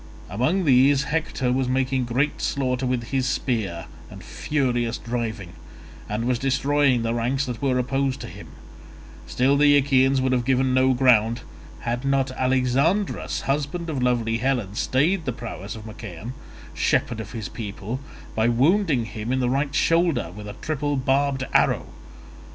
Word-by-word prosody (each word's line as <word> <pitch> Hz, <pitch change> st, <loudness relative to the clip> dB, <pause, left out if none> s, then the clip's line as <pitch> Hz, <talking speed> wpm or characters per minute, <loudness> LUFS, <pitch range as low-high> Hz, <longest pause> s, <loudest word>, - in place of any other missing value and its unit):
Among 155 Hz, -, +1 dB
these 135 Hz, +1 st, +5 dB
Hector 150 Hz, -4 st, -1 dB
was 130 Hz, 0 st, +1 dB
making 130 Hz, 0 st, 0 dB
great 130 Hz, +5 st, -1 dB
slaughter 130 Hz, -2 st, -1 dB
with 125 Hz, -2 st, -1 dB
his 130 Hz, -1 st, +1 dB
spear 110 Hz, -11 st, -2 dB, 0.2 s
and -, -, -11 dB
furious 120 Hz, -5 st, -1 dB
driving, 115 Hz, -6 st, -4 dB, 0.6 s
and 105 Hz, +3 st, -2 dB
was 125 Hz, -1 st, +1 dB
destroying 135 Hz, -1 st, +2 dB
the 115 Hz, 0 st, 0 dB
ranks 125 Hz, +4 st, 0 dB
that 125 Hz, -4 st, -5 dB
were 135 Hz, -2 st, +1 dB
opposed 135 Hz, +1 st, 0 dB
to -, -, -6 dB
him; -, -, -11 dB, 0.8 s
still 130 Hz, +3 st, +2 dB
the 145 Hz, 0 st, +6 dB
Achaeans 135 Hz, -1 st, +3 dB
would 130 Hz, 0 st, +1 dB
have 125 Hz, -1 st, +1 dB
given 130 Hz, 0 st, +2 dB
no 130 Hz, 0 st, +3 dB
ground, 120 Hz, -2 st, +3 dB, 0.4 s
had 120 Hz, +2 st, -2 dB
not 135 Hz, -1 st, +1 dB
Alexandrus 130 Hz, +10 st, 0 dB
husband 150 Hz, +4 st, -2 dB
of 135 Hz, -4 st, -2 dB
lovely 120 Hz, -2 st, +1 dB
Helen 120 Hz, -6 st, -1 dB
stayed 155 Hz, -, +1 dB
the 125 Hz, -, 0 dB
prowess 110 Hz, -3 st, -7 dB
of 110 Hz, -1 st, -10 dB
Machaon, 110 Hz, 0 st, -8 dB, 0.4 s
shepherd 115 Hz, -2 st, 0 dB
of 110 Hz, +1 st, -7 dB
his 110 Hz, -4 st, -4 dB
people, 105 Hz, +2 st, -6 dB, 0.3 s
by 110 Hz, +1 st, +1 dB
wounding 140 Hz, -, +2 dB
him 110 Hz, +2 st, -5 dB
in 130 Hz, -, +1 dB
the 125 Hz, -1 st, +1 dB
right 140 Hz, +1 st, -1 dB
shoulder 165 Hz, -, +2 dB
with 105 Hz, 0 st, -8 dB
a 105 Hz, -, -7 dB
triple 145 Hz, -2 st, -1 dB
barbed 135 Hz, 0 st, +1 dB
arrow. -, -, +3 dB
130 Hz, 155 wpm, -24 LUFS, 115-140 Hz, 0.8 s, the